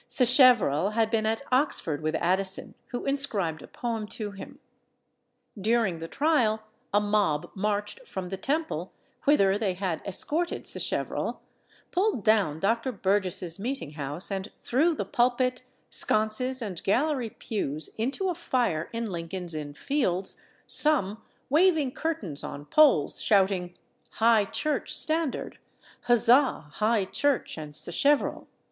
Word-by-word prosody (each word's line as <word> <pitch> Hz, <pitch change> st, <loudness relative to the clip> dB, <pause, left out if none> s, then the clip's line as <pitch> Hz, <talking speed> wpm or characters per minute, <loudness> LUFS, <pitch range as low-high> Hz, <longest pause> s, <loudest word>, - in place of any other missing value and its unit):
Sacheverell 245 Hz, -, +4 dB
had 225 Hz, 0 st, +1 dB
been 220 Hz, -2 st, +1 dB
at 225 Hz, +4 st, -1 dB
Oxford 250 Hz, -, +1 dB
with 155 Hz, +1 st, -1 dB
Addison, 190 Hz, +2 st, 0 dB
who 245 Hz, -, -5 dB
inscribed 215 Hz, -, -1 dB
a -, -, -11 dB
poem 225 Hz, -3 st, -4 dB
to 210 Hz, -1 st, -4 dB
him. 200 Hz, -, -10 dB, 1.0 s
During 215 Hz, -4 st, +1 dB
the 165 Hz, -, -6 dB
trial, 235 Hz, -, +1 dB, 0.3 s
a 205 Hz, -, +4 dB
mob 205 Hz, -8 st, 0 dB
marched 210 Hz, -, -2 dB
from 185 Hz, -2 st, -5 dB
the 195 Hz, -, -3 dB
Temple, 310 Hz, +10 st, -2 dB, 0.3 s
whither 200 Hz, -9 st, +4 dB
they 195 Hz, -4 st, -1 dB
had 180 Hz, -3 st, -3 dB
escorted 310 Hz, -, -1 dB
Sacheverell, -, -, -2 dB, 0.5 s
pulled 370 Hz, -, 0 dB
down 205 Hz, -9 st, +2 dB
Dr. 230 Hz, +7 st, 0 dB
Burgess's 190 Hz, -4 st, 0 dB
meeting 240 Hz, -, -3 dB
house, 150 Hz, +5 st, -4 dB
and 195 Hz, +1 st, -4 dB
threw 310 Hz, +7 st, +2 dB
the 205 Hz, -, -3 dB
pulpit, 250 Hz, +3 st, +1 dB, 0.3 s
sconces, 230 Hz, +4 st, 0 dB
and 190 Hz, -6 st, -6 dB
gallery 255 Hz, +4 st, +1 dB
pews 155 Hz, -10 st, -3 dB
into 275 Hz, -, -1 dB
a -, -, 0 dB
fire 245 Hz, -, -1 dB
in 230 Hz, 0 st, -3 dB
Lincoln's 175 Hz, -2 st, -5 dB
Inn 145 Hz, -2 st, -6 dB
Fields, 195 Hz, -, -1 dB, 0.3 s
some 225 Hz, -9 st, +3 dB, 0.3 s
waving 310 Hz, -2 st, +3 dB
curtains 240 Hz, -, -3 dB
on 145 Hz, +1 st, -7 dB
poles, 270 Hz, -, +4 dB
shouting, 190 Hz, -3 st, +1 dB, 0.4 s
"High 225 Hz, -2 st, +4 dB
Church 300 Hz, +6 st, -2 dB
standard!" 315 Hz, -2 st, +1 dB, 0.5 s
"Huzza! 240 Hz, -, +3 dB
High 215 Hz, 0 st, +1 dB
Church 285 Hz, +7 st, 0 dB
and 150 Hz, -2 st, -8 dB
Sacheverell!" 275 Hz, -, +1 dB
215 Hz, 130 wpm, -27 LUFS, 185-260 Hz, 1.0 s, Sacheverell